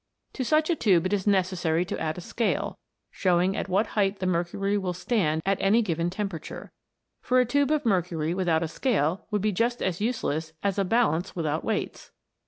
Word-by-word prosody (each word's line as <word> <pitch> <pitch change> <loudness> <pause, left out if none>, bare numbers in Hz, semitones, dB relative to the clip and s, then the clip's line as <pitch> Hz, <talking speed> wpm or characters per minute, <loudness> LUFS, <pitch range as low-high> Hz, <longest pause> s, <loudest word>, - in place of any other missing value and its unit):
To 260 - -3
such 310 +5 +2
a - - +2
tube 185 - +3
it 185 - 0
is 200 0 -1
necessary 180 -4 +1
to - - -4
add 155 +1 -2
a - - -5
scale, 230 +6 -2 0.3
showing 185 0 +2
at - - -3
what 195 +4 +2
height 200 -1 +1
the 185 - -3
mercury 185 +3 0
will 190 -3 -1
stand 175 -5 0
at 195 0 +1
any 215 +5 +4
given 170 -3 -1
temperature, 190 -3 -6 0.5
for 255 0 +2
a 250 - +4
tube 285 +4 +1
of 305 -1 +1
mercury 175 -6 0
without 175 -3 +1
a - - -1
scale 175 - 0
would 210 -3 -1
be 215 - +2
just 235 +5 0
as 185 0 -2
useless 160 -9 -2
as 200 0 0
a - - +3
balance 195 -3 +1
without 155 -2 -1
weights. 220 -2 -3
190 Hz, 195 wpm, -26 LUFS, 170-215 Hz, 0.5 s, any